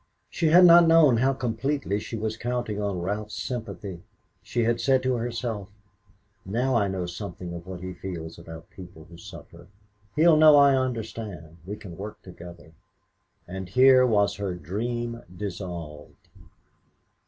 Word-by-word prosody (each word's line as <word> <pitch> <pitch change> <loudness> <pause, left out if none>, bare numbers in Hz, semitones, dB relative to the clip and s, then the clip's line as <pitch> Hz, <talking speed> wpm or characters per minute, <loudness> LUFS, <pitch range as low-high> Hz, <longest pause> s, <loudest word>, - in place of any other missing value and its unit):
She 165 - 0
had 175 +3 +7
not 170 -1 +8
known 160 -7 +6
how 130 +3 +2
completely 125 -3 -2
she 115 - -6
was 110 0 -3
counting 120 -3 -3
on 100 -4 -2
Ralph's 105 +3 -4
sympathy. 100 -7 -6 0.4
She 120 - -2
had 115 +1 0
said 130 -2 +2
to 130 0 +1
herself: 115 -3 -4 0.7
"Now 120 +7 -1
I 110 -4 +2
know 95 -2 -3
something 90 0 -7
of 85 +1 -9
what 90 -2 -7
he 90 0 -6
feels 85 -3 -7
about 80 0 -11
people 90 -4 -12
who 85 0 -14
suffer; 85 -3 -13 0.5
he'll 160 +1 +5
know 155 -1 +8
I 140 -1 +6
understand; 110 -9 -4
we 105 - -4
can 95 -5 -11
work 105 +2 -7
together." 85 -3 -12 0.8
And 95 +1 -7
here 130 +4 +6
was 105 -5 +2
her 100 -3 -3
dream 115 +8 -4 0.2
dissolved. 85 -6 -8
105 Hz, 150 wpm, -25 LUFS, 90-125 Hz, 0.8 s, not